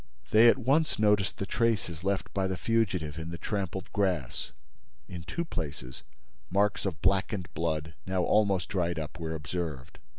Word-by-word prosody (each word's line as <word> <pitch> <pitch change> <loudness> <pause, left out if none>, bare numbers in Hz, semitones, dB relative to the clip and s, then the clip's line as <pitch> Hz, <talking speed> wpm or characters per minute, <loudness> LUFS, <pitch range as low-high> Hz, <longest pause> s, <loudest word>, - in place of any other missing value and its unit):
They 110 +2 +8
at 115 - +6
once 140 +5 +2
noticed 105 -3 +3
the 100 - -2
traces 105 -8 0
left 95 -1 -1
by 95 -1 +1
the 95 -1 -2
fugitive 90 -10 0
in 80 0 -5
the 85 - -5
trampled 95 0 -3
grass. 90 -10 -1 0.6
In 90 -2 -7
two 170 - -3
places, 70 - -5 0.5
marks 100 +2 +2
of 85 -4 -5
blackened 95 0 +1
blood, 80 -1 -1
now 95 -1 +1
almost 100 -4 +3
dried 85 -3 0
up, 80 +1 -5
were 80 -1 -3
observed. 80 -3 -5
95 Hz, 160 wpm, -29 LUFS, 80-105 Hz, 0.6 s, They